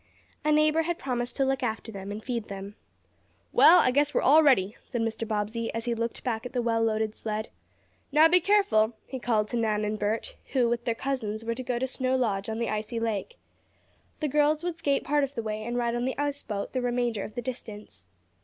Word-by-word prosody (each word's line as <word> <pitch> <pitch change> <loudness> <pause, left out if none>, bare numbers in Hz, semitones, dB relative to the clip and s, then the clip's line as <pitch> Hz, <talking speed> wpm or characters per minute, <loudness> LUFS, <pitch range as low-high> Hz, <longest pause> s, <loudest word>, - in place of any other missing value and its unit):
A 305 - +2
neighbor 305 +1 +4
had 340 +1 -2
promised 245 -4 -3
to 270 - +2
look 270 0 0
after 225 +1 -3
them 195 -1 -7
and 210 +1 -6
feed 235 -4 -3
them. 200 0 -7 0.8
"Well, 345 +3 +8
I - - +4
guess 290 +2 +2
we're - - +2
all 300 +5 +7
ready," 225 -9 +3
said 240 -3 -4
Mr. 225 0 -2
Bobbsey, 220 +2 -2
as 230 +1 -3
he 240 - 0
looked 230 0 -3
back 225 -3 -2
at 250 - -7
the 250 - 0
well 230 -1 +1
loaded 220 -1 0
sled. 215 0 -4 0.6
"Now 305 +3 +7
be 360 +2 +5
careful," 360 - +3
he 260 - -6
called 220 -4 +1
to 240 - -2
Nan 215 -2 +1
and 210 0 -2
Bert, 220 - -2 0.2
who 250 -3 +3
with 235 0 -1
their 235 -2 0
cousins 225 -5 -3
were 230 - 0
to 245 - -5
go 250 -1 -2
to 255 - 0
Snow 260 0 -1
Lodge 210 -5 0
on 220 - -3
the 235 0 -1
icy 215 +2 -3
lake. 225 - -3 0.8
The 305 - +1
girls 300 +2 +2
would 345 -2 -3
skate 280 -3 +1
part 295 0 +2
of 275 +1 -3
the 230 - -3
way 215 0 -3
and 240 +2 -3
ride 235 -1 0
on 240 +1 -1
the 260 - -2
ice 285 0 -2
boat 200 -2 -5
the 255 - 0
remainder 240 -3 0
of 215 - -8
the 245 - -2
distance. 210 - -8
235 Hz, 230 wpm, -27 LUFS, 220-270 Hz, 0.8 s, Well